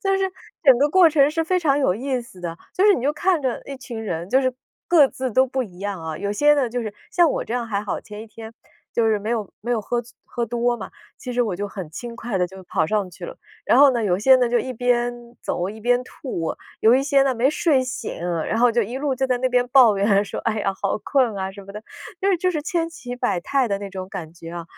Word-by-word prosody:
就 390 Hz, -1 st, +2 dB
是 385 Hz, -1 st, -1 dB, 0.3 s
整 265 Hz, -6 st, +6 dB
个 290 Hz, -, +3 dB
过 350 Hz, +1 st, +6 dB
程 290 Hz, -2 st, +4 dB
是 325 Hz, +1 st, -1 dB
非 365 Hz, +3 st, +1 dB
常 290 Hz, -5 st, +2 dB
有 265 Hz, -10 st, +2 dB
意 260 Hz, +4 st, -2 dB
思 235 Hz, -6 st, -11 dB
的。 170 Hz, -1 st, -5 dB, 0.2 s
就 370 Hz, -, +1 dB
是 410 Hz, -, +7 dB
你 -, -, -3 dB
就 285 Hz, +3 st, +1 dB
看 345 Hz, +1 st, +1 dB
着 255 Hz, -3 st, -1 dB
一 275 Hz, -, -6 dB
群 245 Hz, -3 st, -7 dB
人， 175 Hz, -3 st, -4 dB
就 265 Hz, -, +4 dB
是 255 Hz, -1 st, 0 dB, 0.3 s
各 325 Hz, -5 st, +6 dB
自 260 Hz, -1 st, -4 dB
都 260 Hz, +4 st, +3 dB
不 265 Hz, 0 st, -2 dB
一 185 Hz, -6 st, -11 dB
样 200 Hz, -3 st, -4 dB
啊。 160 Hz, -1 st, -4 dB
有 200 Hz, +4 st, -3 dB
些 295 Hz, +7 st, +4 dB
呢， 270 Hz, -5 st, 0 dB
就 245 Hz, +1 st, -2 dB
是 215 Hz, -3 st, -5 dB, 0.2 s
像 345 Hz, -3 st, +4 dB
我 -, -, -2 dB
这 -, -, -6 dB
样 245 Hz, -1 st, -1 dB
还 205 Hz, -2 st, -2 dB
好， 205 Hz, -, -3 dB
前 210 Hz, 0 st, -9 dB
一 -, -, -11 dB
天 225 Hz, +1 st, -11 dB, 0.4 s
就 230 Hz, -, +2 dB
是 220 Hz, -1 st, +2 dB
没 210 Hz, +2 st, -6 dB
有 225 Hz, -4 st, -2 dB
没 235 Hz, -, -5 dB
有 235 Hz, -2 st, +1 dB
喝 240 Hz, +3 st, -1 dB
醉 235 Hz, 0 st, -17 dB, 0.2 s
喝 235 Hz, -1 st, -2 dB
多 240 Hz, 0 st, 0 dB
嘛， 195 Hz, -4 st, -8 dB, 0.3 s
其 250 Hz, -, -6 dB
实 245 Hz, 0 st, +2 dB
我 215 Hz, -6 st, -2 dB
就 205 Hz, +2 st, -3 dB
很 190 Hz, -6 st, -7 dB
轻 235 Hz, +8 st, -7 dB
快 225 Hz, -4 st, -3 dB
地 180 Hz, -, +2 dB
就 190 Hz, +1 st, -12 dB
跑 160 Hz, -2 st, 0 dB
上 205 Hz, 0 st, -1 dB
去 -, -, -10 dB
了。 -, -, -9 dB, 0.3 s
然 -, -, +4 dB
后 285 Hz, 0 st, +8 dB
呢， 240 Hz, -3 st, -1 dB
有 180 Hz, -3 st, +2 dB
些 260 Hz, +6 st, +6 dB
呢， 250 Hz, -1 st, +2 dB
就 240 Hz, -, +1 dB
一 260 Hz, -, -3 dB
边 245 Hz, 0 st, +1 dB, 0.3 s
走 175 Hz, +1 st, -2 dB
一 215 Hz, +2 st, -8 dB
边 245 Hz, +2 st, +2 dB
吐， 210 Hz, -, -5 dB, 0.3 s
有 225 Hz, +2 st, +6 dB
一 265 Hz, -, +3 dB
些 275 Hz, -1 st, +3 dB
呢 270 Hz, -1 st, +1 dB
没 250 Hz, +4 st, +2 dB
睡 300 Hz, -4 st, +2 dB
醒， 255 Hz, +2 st, -5 dB, 0.3 s
然 -, -, -1 dB
后 245 Hz, +1 st, +5 dB
就 235 Hz, -, +2 dB
一 230 Hz, +5 st, -5 dB
路 280 Hz, -1 st, -1 dB
就 265 Hz, +1 st, 0 dB
在 255 Hz, -1 st, +1 dB
那 255 Hz, +1 st, +1 dB
边 245 Hz, 0 st, +2 dB
抱 245 Hz, -6 st, +6 dB
怨 200 Hz, 0 st, +3 dB
说 -, -, -6 dB
“哎 220 Hz, -2 st, 0 dB
呀， 195 Hz, -1 st, 0 dB
好 200 Hz, -, 0 dB
困 255 Hz, -7 st, +1 dB
啊！” 190 Hz, 0 st, -3 dB
什 200 Hz, +1 st, -11 dB
么 200 Hz, -, -11 dB
的， 210 Hz, +1 st, -8 dB, 0.4 s
就 390 Hz, -, +1 dB
是 380 Hz, -, +3 dB
就 365 Hz, +2 st, +1 dB
是 305 Hz, -3 st, -2 dB
千 330 Hz, +1 st, -1 dB
奇 260 Hz, -7 st, -8 dB
百 245 Hz, -8 st, 0 dB
态 270 Hz, +7 st, +1 dB
的 200 Hz, -1 st, -1 dB
那 200 Hz, -1 st, -7 dB
种 185 Hz, -1 st, -6 dB
感 160 Hz, -4 st, -7 dB
觉 165 Hz, -1 st, -10 dB
啊。 170 Hz, 0 st, -6 dB
240 Hz, 300 characters per minute, -22 LUFS, 205-270 Hz, 0.4 s, 后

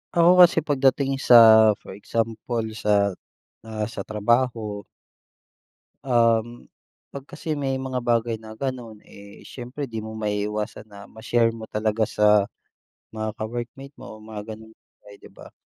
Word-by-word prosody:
Ako 175 Hz, +2 st, +5 dB
kasi 170 Hz, -3 st, +6 dB
pagdating 135 Hz, -2 st, +1 dB
sa 125 Hz, -, +5 dB, 0.5 s
for -, -, -11 dB
example 115 Hz, +3 st, -3 dB, 0.2 s
sa, 100 Hz, -1 st, +2 dB, 0.6 s
ah, 110 Hz, -1 st, -4 dB
sa -, -, -6 dB
trabaho. 110 Hz, -1 st, 0 dB, 1.3 s
Um, 120 Hz, -1 st, +1 dB, 0.4 s
'pag 140 Hz, -1 st, -9 dB
kasi 155 Hz, +1 st, -5 dB
may 135 Hz, -2 st, -2 dB
mga 130 Hz, -1 st, -3 dB
bagay 115 Hz, -1 st, +1 dB
na 110 Hz, 0 st, -12 dB
gano'n, 120 Hz, -3 st, -6 dB
eh, 100 Hz, 0 st, -15 dB
siyempre 130 Hz, +2 st, -8 dB
di 115 Hz, -, -6 dB
mo 110 Hz, 0 st, -8 dB
maiiwasan 105 Hz, 0 st, -3 dB
na 100 Hz, -2 st, -14 dB
ma-share 115 Hz, +1 st, 0 dB
mo 110 Hz, -, -8 dB
talaga 110 Hz, +1 st, -1 dB
sa 105 Hz, -1 st, +3 dB, 0.7 s
mga 110 Hz, 0 st, -5 dB
ka-workmate 120 Hz, +5 st, -7 dB
mo 110 Hz, 0 st, -11 dB
mga 110 Hz, 0 st, -8 dB
gano'ng 110 Hz, 0 st, -15 dB, 0.3 s
bagay 100 Hz, 0 st, -14 dB
'di -, -, -15 dB
ba? -, -, -14 dB
115 Hz, 140 wpm, -23 LUFS, 105-125 Hz, 1.3 s, kasi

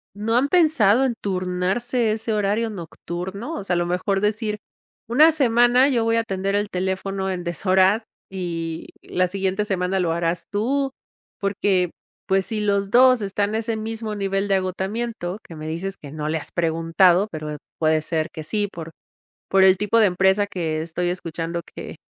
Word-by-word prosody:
¿No 225 Hz, +3 st, 0 dB
han 270 Hz, -, +3 dB
pensado 280 Hz, -, +4 dB
en 240 Hz, -, -1 dB
turnarse 195 Hz, +5 st, 0 dB
ese 220 Hz, +1 st, -3 dB
horario 210 Hz, +2 st, 0 dB
nocturno? 190 Hz, -, -6 dB
O -, -, -5 dB
sea, 185 Hz, -2 st, -1 dB
a -, -, +2 dB
lo 175 Hz, -, +1 dB
mejor 185 Hz, +2 st, 0 dB
decir 210 Hz, 0 st, -1 dB, 0.5 s
"una 305 Hz, +7 st, +6 dB
semana 245 Hz, -1 st, +4 dB
yo 240 Hz, -4 st, +1 dB
voy 230 Hz, -, +2 dB
a 230 Hz, -, +3 dB
atender 195 Hz, -2 st, -2 dB
el 205 Hz, 0 st, 0 dB
teléfono 190 Hz, +1 st, -2 dB
en 180 Hz, -2 st, -3 dB
deshoras 190 Hz, +5 st, +2 dB, 0.3 s
y 165 Hz, -3 st, -4 dB
la 185 Hz, 0 st, 0 dB
siguiente 195 Hz, +2 st, -1 dB
semana 190 Hz, -2 st, 0 dB
lo 170 Hz, -2 st, +1 dB
harás 170 Hz, 0 st, -1 dB
tú", 265 Hz, +7 st, 0 dB, 0.5 s
porque, 195 Hz, -3 st, +1 dB, 0.4 s
pues, 190 Hz, 0 st, +2 dB
si 215 Hz, -2 st, -3 dB
los 200 Hz, -1 st, +1 dB
2 255 Hz, +1 st, +6 dB
están 200 Hz, 0 st, -1 dB
en 215 Hz, -, -3 dB
ese 225 Hz, 0 st, -1 dB
mismo 220 Hz, 0 st, -4 dB
nivel 195 Hz, 0 st, -1 dB
de 195 Hz, -, +2 dB
agotamiento 190 Hz, +1 st, -3 dB
que 165 Hz, -, -11 dB
me 155 Hz, 0 st, -7 dB
dices 185 Hz, +5 st, -4 dB
que 140 Hz, -2 st, -9 dB
no 155 Hz, 0 st, -4 dB
le 160 Hz, -, 0 dB
has -, -, -7 dB
preguntado, 170 Hz, +3 st, +3 dB
pero 155 Hz, -1 st, -5 dB, 0.2 s
puede 155 Hz, -1 st, +2 dB
ser 155 Hz, 0 st, -2 dB
que 155 Hz, -, -7 dB
sí, 205 Hz, +5 st, -1 dB
por 165 Hz, -2 st, -8 dB, 0.6 s
por 190 Hz, 0 st, +5 dB
el 190 Hz, -1 st, +6 dB
tipo 210 Hz, +3 st, +2 dB
de 220 Hz, -, +6 dB
empresa 190 Hz, +2 st, +2 dB
que 160 Hz, -5 st, -2 dB
estoy 170 Hz, +2 st, -2 dB
escuchando 170 Hz, -1 st, -4 dB
que -, -, -8 dB
195 Hz, 180 wpm, -22 LUFS, 175-220 Hz, 0.6 s, una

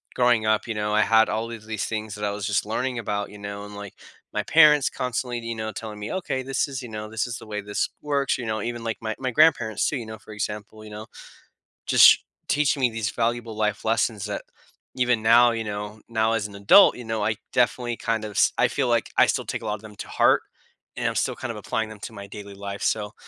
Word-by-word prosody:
growing 120 Hz, -3 st, +3 dB
up, 110 Hz, +1 st, +1 dB
you 115 Hz, -, -3 dB
know, 105 Hz, 0 st, -1 dB
I 110 Hz, -, +5 dB
had 110 Hz, +1 st, +4 dB
all 110 Hz, +2 st, -2 dB
of 110 Hz, -2 st, -9 dB
these 110 Hz, -2 st, -3 dB
things 110 Hz, -1 st, -4 dB
that 105 Hz, -, -7 dB
I 105 Hz, -, +1 dB
was 100 Hz, 0 st, -4 dB
just 105 Hz, 0 st, +1 dB
learning 125 Hz, +3 st, -2 dB
about, 105 Hz, -2 st, -3 dB
you 105 Hz, -, -11 dB
know, 100 Hz, 0 st, -6 dB
and, 105 Hz, 0 st, -10 dB
like, 100 Hz, -1 st, -9 dB, 0.4 s
my -, -, -1 dB
parents 150 Hz, -3 st, +6 dB
constantly, 125 Hz, -1 st, -3 dB
you 115 Hz, 0 st, -5 dB
know, 110 Hz, 0 st, -4 dB
telling 105 Hz, -2 st, -7 dB
me, 105 Hz, -, -5 dB
"Okay. 175 Hz, -8 st, -2 dB
This 135 Hz, +2 st, 0 dB
is, 135 Hz, -2 st, -5 dB
you 120 Hz, -, -8 dB
know, 110 Hz, 0 st, -6 dB
this 110 Hz, 0 st, -1 dB
is 120 Hz, -1 st, -4 dB
the -, -, -12 dB
way 105 Hz, -1 st, -4 dB
this 105 Hz, 0 st, -2 dB
works," 140 Hz, -2 st, 0 dB
you 120 Hz, -, -5 dB
know? 110 Hz, -1 st, -2 dB
Even 120 Hz, 0 st, -4 dB
like 115 Hz, -1 st, -3 dB
my 110 Hz, -1 st, -3 dB
my 130 Hz, -1 st, -2 dB
grandparents 120 Hz, -7 st, +3 dB
too, 145 Hz, -, -1 dB
you 115 Hz, -, -6 dB
know? 110 Hz, -1 st, -9 dB
For 110 Hz, -, -14 dB
example, 105 Hz, +1 st, -5 dB
you -, -, -10 dB
know, 105 Hz, +1 st, -8 dB, 0.8 s
just -, -, +8 dB, 0.3 s
teaching 145 Hz, -1 st, +2 dB
me 125 Hz, -, +4 dB
these 110 Hz, -2 st, -2 dB
valuable 115 Hz, -1 st, -2 dB
life 105 Hz, -1 st, -1 dB
lessons 110 Hz, -2 st, +1 dB
that 105 Hz, -, -4 dB, 0.5 s
even 125 Hz, -3 st, +2 dB
now, 120 Hz, +2 st, +6 dB
you 115 Hz, -1 st, -2 dB
know, 105 Hz, 0 st, -6 dB
now 110 Hz, 0 st, +1 dB
as 105 Hz, -2 st, -1 dB
an 100 Hz, -, -13 dB
adult, 100 Hz, -, +6 dB
you 125 Hz, -, -8 dB
know, 110 Hz, -1 st, -2 dB
I 110 Hz, 0 st, 0 dB, 0.2 s
definitely 120 Hz, 0 st, +1 dB
kind 115 Hz, -1 st, -1 dB
of 105 Hz, -, -6 dB
s -, -, +3 dB
I -, -, +4 dB
feel -, -, 0 dB
like -, -, +1 dB
I -, -, +7 dB
still -, -, 0 dB
take -, -, -4 dB
a -, -, -8 dB
lot 105 Hz, -1 st, -1 dB
of 105 Hz, -, -12 dB
them 105 Hz, -1 st, -12 dB
to -, -, -7 dB
heart, -, -, +4 dB, 0.6 s
and -, -, -3 dB
I'm -, -, -2 dB
still -, -, 0 dB
kind -, -, -5 dB
of -, -, -7 dB
applying 110 Hz, -1 st, -2 dB
them 110 Hz, -1 st, -11 dB
to 115 Hz, -, -7 dB
my 100 Hz, -1 st, -9 dB
daily 100 Hz, 0 st, -9 dB
life, 100 Hz, 0 st, -6 dB
so, 105 Hz, -1 st, -1 dB
110 Hz, 255 wpm, -24 LUFS, 105-120 Hz, 0.8 s, just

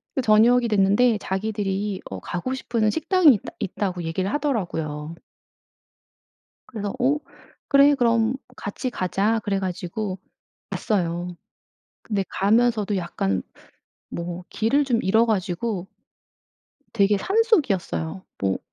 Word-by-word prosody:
그 265 Hz, -, +1 dB
저녁이 235 Hz, +2 st, +5 dB
됐는데 210 Hz, +3 st, +3 dB
자기들이 200 Hz, 0 st, -2 dB
어 95 Hz, -, -5 dB
"가고 180 Hz, -, -4 dB
싶은 230 Hz, -4 st, 0 dB
식당이 320 Hz, -, +5 dB
있다 205 Hz, -, -4 dB
있다."고 180 Hz, -2 st, -3 dB
얘기를 185 Hz, +4 st, -2 dB
하더라고요. 165 Hz, -, -2 dB, 1.5 s
그래서 205 Hz, -4 st, -5 dB
"어 275 Hz, +4 st, +3 dB, 0.5 s
그래 280 Hz, +1 st, +6 dB
그럼 235 Hz, -2 st, +2 dB, 0.2 s
같이 205 Hz, +5 st, -4 dB
가자." 205 Hz, +2 st, 0 dB
그래 200 Hz, -1 st, 0 dB
가지고 185 Hz, +1 st, -4 dB, 0.5 s
갔어요. 175 Hz, -4 st, -2 dB, 0.7 s
근데 200 Hz, -3 st, -1 dB
가면서도 215 Hz, 0 st, +2 dB
약간 100 Hz, -, -1 dB, 0.7 s
뭐 175 Hz, +1 st, -5 dB
길을 275 Hz, +7 st, +2 dB
좀 240 Hz, -4 st, +1 dB
잃어 220 Hz, +5 st, +3 dB
가지고 190 Hz, -1 st, -1 dB, 1.1 s
되게 205 Hz, -1 st, +3 dB
산속이었어요. 255 Hz, -, +1 dB, 0.2 s
뭐 95 Hz, -1 st, 0 dB
205 Hz, 250 characters per minute, -24 LUFS, 185-235 Hz, 1.5 s, 그래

